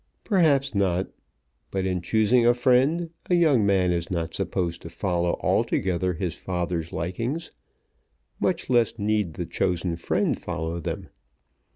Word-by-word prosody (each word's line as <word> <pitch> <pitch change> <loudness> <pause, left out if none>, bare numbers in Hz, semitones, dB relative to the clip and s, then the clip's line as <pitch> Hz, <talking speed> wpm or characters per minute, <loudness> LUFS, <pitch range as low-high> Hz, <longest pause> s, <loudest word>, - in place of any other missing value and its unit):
Perhaps 150 - +3
not. 95 -2 +1 0.6
But 95 -1 -2
in 90 -2 -1
choosing 110 +6 +3
a 120 +1 +5
friend 135 +7 +2 0.2
a 180 - +4
young 155 -10 +4
man 95 -2 +3
is 85 -1 -1
not 85 -2 -2
supposed 90 -3 -2
to 85 - -8
follow 85 -1 -1
altogether 90 -1 +1
his 85 -1 -2
father's 85 -2 -3
likings, 115 - -3 0.9
much - - 0
less 120 -3 +2
need 105 -6 0
the 90 - -3
chosen 90 -1 -1
friend 85 - 0
follow 85 -1 -3
them. 85 - -5
95 Hz, 140 wpm, -25 LUFS, 85-120 Hz, 0.9 s, a